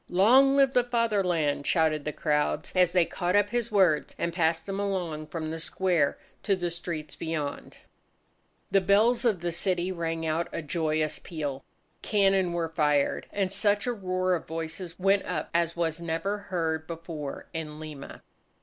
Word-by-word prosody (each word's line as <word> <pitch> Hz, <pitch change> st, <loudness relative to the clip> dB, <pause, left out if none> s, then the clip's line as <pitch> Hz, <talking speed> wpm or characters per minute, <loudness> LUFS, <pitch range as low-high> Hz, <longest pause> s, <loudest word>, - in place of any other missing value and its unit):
"Long 255 Hz, +9 st, +5 dB
live 275 Hz, -1 st, +4 dB
the 250 Hz, -, +4 dB
Fatherland!" 195 Hz, -12 st, 0 dB
shouted 155 Hz, -3 st, +2 dB
the 150 Hz, -, -1 dB
crowds, 150 Hz, 0 st, -1 dB
as 180 Hz, -2 st, +4 dB
they 175 Hz, -1 st, +4 dB
caught 180 Hz, +2 st, -1 dB
up 205 Hz, 0 st, +3 dB
his 235 Hz, -1 st, -1 dB
words 185 Hz, -7 st, +3 dB
and 170 Hz, -, -2 dB
passed 165 Hz, -1 st, +1 dB
them 195 Hz, 0 st, -4 dB
along 175 Hz, -6 st, -2 dB
from 155 Hz, 0 st, -4 dB
the 165 Hz, -, -4 dB
square 170 Hz, -3 st, +1 dB, 0.2 s
to 200 Hz, -, +1 dB
the 175 Hz, -2 st, -2 dB
streets 165 Hz, -3 st, -5 dB
beyond. 155 Hz, -3 st, -4 dB, 0.9 s
The 195 Hz, -, +4 dB
bells 220 Hz, +6 st, +3 dB
of 210 Hz, -7 st, +2 dB
the 175 Hz, 0 st, -1 dB
city 180 Hz, +1 st, 0 dB
rang 165 Hz, -2 st, -3 dB
out 160 Hz, +2 st, 0 dB
a 165 Hz, -, -4 dB
joyous 155 Hz, -1 st, -1 dB
peal. 145 Hz, -5 st, -5 dB, 0.4 s
Cannon 195 Hz, -3 st, +2 dB
were 170 Hz, -1 st, -1 dB
fired. 150 Hz, -3 st, +1 dB
And 195 Hz, -2 st, -1 dB
such 205 Hz, 0 st, +2 dB
a 245 Hz, -, 0 dB
roar 185 Hz, -3 st, -1 dB
of 175 Hz, -, -3 dB
voices 165 Hz, +2 st, -5 dB
went 195 Hz, +1 st, +3 dB
up -, -, -3 dB
as 170 Hz, 0 st, +1 dB
was 170 Hz, -1 st, -1 dB
never 170 Hz, +5 st, -2 dB
heard 160 Hz, -3 st, -1 dB
before 165 Hz, -4 st, -6 dB
in 155 Hz, -2 st, -5 dB
Lima. 155 Hz, -3 st, -9 dB
170 Hz, 165 wpm, -28 LUFS, 160-195 Hz, 0.9 s, Long